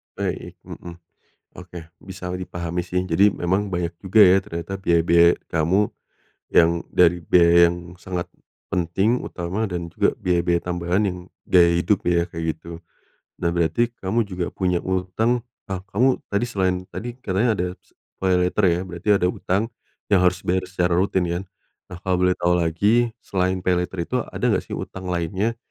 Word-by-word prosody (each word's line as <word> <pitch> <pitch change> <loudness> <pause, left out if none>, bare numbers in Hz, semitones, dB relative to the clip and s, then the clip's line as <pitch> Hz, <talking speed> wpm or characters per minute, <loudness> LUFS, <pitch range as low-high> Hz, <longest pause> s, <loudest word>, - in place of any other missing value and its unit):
Baik, - - -4
mhm, 85 - -9 0.7
oke, 90 -1 -9 0.2
bisa 95 -1 -7
dipahami 90 -1 -4
sih 90 0 -1
jadi 95 +3 +4
memang 95 +4 0
banyak 90 -2 -2
juga 100 +3 +3
ya 95 0 +6
ternyata 85 -2 -7
biaya-biaya 85 -1 +4 0.2
kamu, 90 +5 +2 0.6
yang 85 0 +4
dari 90 0 +4
biaya 85 0 +5
yang 85 - -5 0.2
sangat, 90 0 -5 0.5
penting, 95 +7 +1
utama, 95 +5 -3
dan 90 -2 -3
juga 85 - 0
biaya-biaya 85 -1 +1
tambahan 90 +3 0
yang 90 -2 -2 0.3
gaya 85 -2 +5
hidup 90 +3 +1
ya 85 -1 +2
kayak 80 -2 -4
gitu, 85 +1 -10 0.6
nah 85 - +1
berarti 85 +8 +1
kamu 100 +5 0
juga 90 -2 -3
punya 90 -2 0
utang 95 +6 0 0.3
ah, 95 -2 -4
kamu 125 +6 +2
tadi 100 +3 0
selain 95 -6 -1
tadi 120 +1 -6
katanya 110 -1 0
ada 90 - -1
se - - -33 0.2
paylater 90 +2 +2
ya 85 0 +1
berarti 85 +3 -7
ada 90 - +1
utang, 95 +3 -1 0.5
yang 95 - +6
harus 90 0 +2
bayar 95 +1 0
secara 90 -1 0
rutin 95 0 +1
kan, 85 +2 -2 0.5
nah 90 - -8
kalo 95 - +1
boleh 90 0 +2
tau 90 0 +1
lagi 100 +8 +2 0.2
selain 95 -1 0
paylater 90 -1 0
itu - - -1
ada - - -5
nggak - - +2
sih - - -4
utang 95 -1 -7
lainnya? 95 +6 -1
90 Hz, 160 wpm, -22 LUFS, 85-95 Hz, 0.7 s, ya